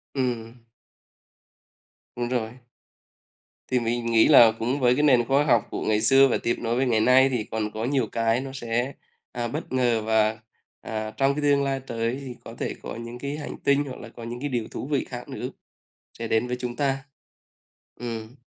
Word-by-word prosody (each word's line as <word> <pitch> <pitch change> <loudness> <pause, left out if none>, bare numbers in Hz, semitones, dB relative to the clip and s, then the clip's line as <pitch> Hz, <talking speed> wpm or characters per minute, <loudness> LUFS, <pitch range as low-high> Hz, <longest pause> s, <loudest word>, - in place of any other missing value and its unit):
Ừm. 120 -3 -2 1.6
Đúng 120 0 -2
rồi. 120 0 -3 1.1
Thì 125 - +3
mình 120 0 -2
nghĩ 115 -1 +4
là 120 -6 +8
cũng 125 +5 -1
với 125 -1 +4
cái 150 - +1
nền 125 -5 +5
khoa 135 +3 +3
học 120 -6 +3
của - - -4
ngày 110 0 +2
xưa 135 +2 +7
và 130 - +1
tiếp 120 - +1
nối 115 0 -1
với 130 +2 +1
ngày 115 -3 +2
nay 130 +3 +6
thì 125 -4 -1
còn 110 -1 -3
có 110 +2 -4
nhiều 130 -3 +1
cái 115 +1 +1
nó 135 0 -6
sẽ, 120 +1 -2 0.4
à, 120 -1 -3
bất 150 +5 -5
ngờ. 120 -3 +2
Và, 110 0 +2 0.4
à, 110 -1 -4
trong 140 +1 +2
cái 150 - -2
tương 145 -1 +3
lai 135 -1 -1
tới 115 +2 -2
thì 125 -3 -7
có - - -9
thể - - -2
có - - -6
những 115 +1 -8
cái 140 +3 -4
hành 150 - -6
tinh 140 +1 +3
hoặc 130 - -8
là 115 - -9
có 115 - -11
những 120 +1 -6
cái 145 +2 -3
điều 120 -4 -2
thú 130 - -5
vị 145 -3 0
khác 120 -1 -7
nữa - - -5 0.7
sẽ 115 - -3
đến 110 +2 +1
với 125 - -2
chúng 120 -1 -4
ta. 135 0 -1 0.9
Ừm. 115 0 -6
120 Hz, 205 wpm, -25 LUFS, 115-135 Hz, 1.6 s, là